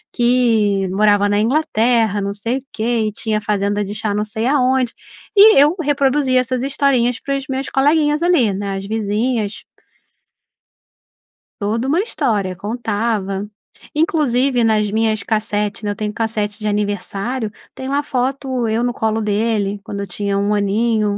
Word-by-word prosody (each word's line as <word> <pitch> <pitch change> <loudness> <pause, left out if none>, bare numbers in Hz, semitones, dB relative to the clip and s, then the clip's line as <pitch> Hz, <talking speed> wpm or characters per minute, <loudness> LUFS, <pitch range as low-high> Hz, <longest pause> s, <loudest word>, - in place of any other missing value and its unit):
que 225 -5 +2
morava 205 +1 +3
na 205 0 +2
Inglaterra, 230 -5 +1
não 200 0 -2
sei 230 +4 -2
o - - -17
quê 225 0 0
e - - -2
tinha 215 0 -1
fazenda 205 0 0
de 200 +1 -5
chá 215 -1 -2
não 210 +1 0
sei 220 +2 -3
aonde. 260 -3 +2 0.4
E 420 +2 +8
eu 300 +4 +4
reproduzia 275 -2 +2
essas 255 0 -2
historinhas 260 -3 +1
para 275 - -2
os 275 - -6
meus 265 0 -2
coleguinhas 295 +2 +2
ali, 280 - +3
né, 200 0 -3
as 195 0 -5
vizinhas 215 +1 -2 1.9
toda 225 +4 -1
uma 320 +7 +2
história, 205 - -1
contava 205 -1 -2 0.5
Inclusive 275 -5 +1
nas 215 -2 +2
minhas 220 -1 +1
cassete 210 -1 -1
eu 205 0 -1
tenho 210 0 -3
cassete 215 -2 -2
de 215 - -3
aniversário, 210 +3 -2 0.2
tem 260 - -6
uma 280 +1 +1
foto 260 -2 -2
eu 225 +2 0
no 245 0 0
colo 220 -1 -1
dele, 210 -1 0
quando 200 - -6
eu 200 - -5
tinha 200 +2 -2
1 200 +1 +1
aninho. 210 +1 +1
220 Hz, 155 wpm, -18 LUFS, 205-255 Hz, 1.9 s, E